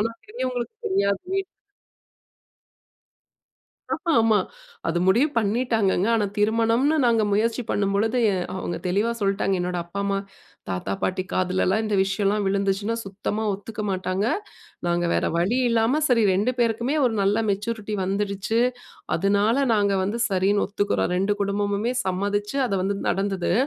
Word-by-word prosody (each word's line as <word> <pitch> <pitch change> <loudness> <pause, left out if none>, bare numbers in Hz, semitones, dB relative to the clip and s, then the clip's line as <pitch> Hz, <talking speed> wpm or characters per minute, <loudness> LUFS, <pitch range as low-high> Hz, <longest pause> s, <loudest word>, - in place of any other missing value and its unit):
ஆனா, 230 +2 0
பெரியவங்களுக்கு 255 - -4
தெரியாது. 200 - +1
வீட் 390 0 0 2.5
ம்ஹூம். - - -3
ஆமா. 225 -2 +4 0.5
அது 165 - 0
முடிவு 235 +11 +4
பண்ணிட்டாங்கங்க. 220 -3 +1
ஆனா 215 -2 +2
திருமணம்ன்னு 230 +7 +2
நாங்க 230 -2 +3
முயற்சி 225 +4 +1
பண்ணும் 200 -1 0
பொழுது, 225 +5 +1
எ - - 0 0.2
அவங்க 175 - -3
தெளிவா 205 +6 +1
சொல்லிட்டாங்க. 195 -1 +1
என்னோட 180 0 -2
அப்பா, 175 +4 -5
அம்மா 200 0 0 0.5
தாத்தா, 90 +1 -3
பாட்டி 185 0 0
காதிலலாம் 185 +3 +1
இந்த 215 -1 -1
விஷயம்லாம் 200 +1 0
விழுந்துச்சுன்னா, 200 +2 0
சுத்தமா 200 +2 -3
ஒத்துக்க 210 +2 -6
மாட்டாங்க. 185 +2 -1 0.6
நாங்க 175 0 +1
வேற - - +1
வழி 195 +9 +1
இல்லாம 230 +6 +2
சரி 240 -3 +4
2 210 +7 +1
பேருக்குமே 235 +3 +1
ஒரு 240 -3 +1
நல்ல 200 +2 +2
மெச்சூரிட்டி 210 +1 -2
வந்துருச்சு. 200 +3 -1 0.6
அதனால 200 +6 +2 0.2
நாங்க 205 -1 +2
வந்து 205 +5 -2
சரின்னு 195 +1 +2
ஒத்துக்கிறோம். 205 -3 0
2 195 +3 +1
குடும்பமுமே 205 +3 0
சம்மதித்து, 205 +5 -1
அது 200 - -2
வந்து 200 +1 -1
நடந்தது. 195 -1 0
205 Hz, 135 wpm, -24 LUFS, 195-225 Hz, 2.5 s, ஆமா